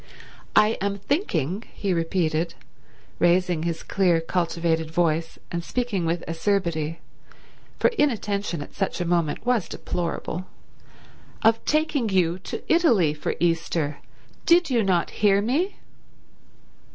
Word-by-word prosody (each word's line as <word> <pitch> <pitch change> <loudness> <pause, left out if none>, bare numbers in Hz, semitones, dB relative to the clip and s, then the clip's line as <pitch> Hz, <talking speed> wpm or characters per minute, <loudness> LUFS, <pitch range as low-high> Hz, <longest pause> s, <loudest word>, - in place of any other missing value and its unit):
"I 215 +1 +4
am 200 0 -1
thinking," 200 - -1
he 195 -2 -1
repeated, 165 -1 0 0.6
raising 175 -1 +3
his 165 0 -3
clear, 180 -4 +2
cultivated 165 -1 -1
voice 165 -1 0
and 170 -1 -2
speaking 210 -6 -1
with 170 +1 -1
acerbity, 165 -3 -1 0.8
for - - +4
inattention 205 - 0
at - - -14
such 195 -1 -2
a 175 - -1
moment 170 +1 0
was 245 -6 +1
deplorable, 175 +1 -4 1.0
"of 225 +1 +4
taking 300 -6 +1
you 180 -2 +2
to 185 - -6
Italy 235 - +4
for 150 - -3
Easter. 165 -3 0 0.5
Did 340 -3 +5
you 240 -2 +3
not 185 -4 +1
hear 200 -2 +5
me?" 285 - 0
180 Hz, 120 wpm, -24 LUFS, 165-215 Hz, 1.0 s, Did